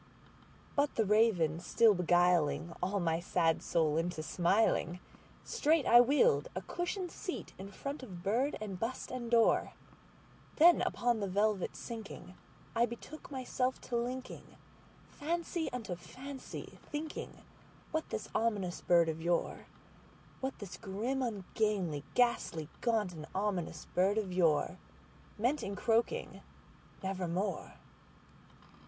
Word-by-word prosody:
'But 285 0 +1
the 225 - +2
Raven 195 -7 +3
still 220 +5 +4
beguiling 175 -2 +2
all 190 +3 0
my 165 -1 0
fancy 165 0 +1
into 160 +1 +1
smiling, 180 +1 +2 0.4
Straight 315 -1 +2
I 240 +1 +9
wheeled 245 - +4
a 185 - -3
cushioned 355 - -3
seat 365 - -6
in 195 +1 -7
front 275 +9 -5
of 185 -9 -9
bird 240 +9 +1
and 200 -4 -5
bust 235 +3 -3
and 245 -2 -4
door; 230 -1 +4 0.8
Then, 340 +2 +7
upon 240 -2 +1
the 200 - -1
velvet 205 0 +1
sinking, 220 -5 -8 0.4
I 235 +1 +4
betook 240 +6 -9
myself 260 -1 -1
to 245 - -4
linkingFancy 290 +6 -5
unto 225 -7 -4
fancy, 265 +9 -9
thinking 300 +1 -6 0.5
what 315 0 -2
this - - -4
ominous 205 -6 0
bird 170 -2 +4
of 160 0 -3
yore, 170 +1 -1 0.7
What 265 0 -3
this 180 -4 -8
grim, 225 +8 -2
ungainly, 200 - -1
ghastly, 235 -10 +1
gaunt, 220 -6 +1
and 155 -2 -8
ominous 190 -4 -2
bird 195 +4 +3
of 205 -4 -1
yoreMeant 185 - -1
in 200 - -4
croaking 235 - 0 0.6
"Nevermore." 190 0 -2
210 Hz, 120 wpm, -33 LUFS, 180-250 Hz, 0.8 s, I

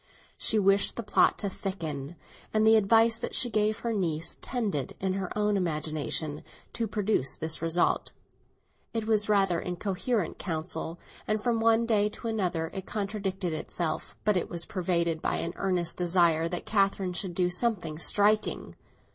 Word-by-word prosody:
She 220 - +1
wished 195 0 +3
the 235 - -4
plot 205 - +3
to 205 - -3
thicken, 165 -7 -5 0.4
and 215 0 +2
the 220 0 +7
advice 225 +2 +4
that - - -4
she 245 - +2
gave 215 0 +1
her 235 -1 -1
niece 170 -5 -2
tended, 210 - -2
in 190 -1 -1
her 190 -2 -3
own 210 0 +2
imagination, 155 -3 -1 0.3
to 230 - -1
produce 205 -11 +1
this 160 0 -1
result. 165 +1 +1 0.8
It 225 -1 -1
was 215 -1 +2
rather 195 -4 +3
incoherent 185 +3 -2
counsel, 160 -1 -4 0.3
and 215 0 +1
from 235 -2 +1
one 225 0 +3
day 210 -2 +2
to 230 - -7
another 180 -7 -1
it 190 -1 -6
contradicted 195 -4 -3
itself; 155 +1 -4
but 210 -1 +3
it 180 - -1
was 170 -1 -1
pervaded 170 -3 -1
by - - 0
an 170 - -3
earnest 180 -3 -1
desire 170 -2 +3
that 175 -1 -3
Catherine 195 -3 +1
should 180 -1 -3
do 180 -1 +1
something 175 -6 0
striking. 210 +3 +2
190 Hz, 160 wpm, -28 LUFS, 170-215 Hz, 0.8 s, the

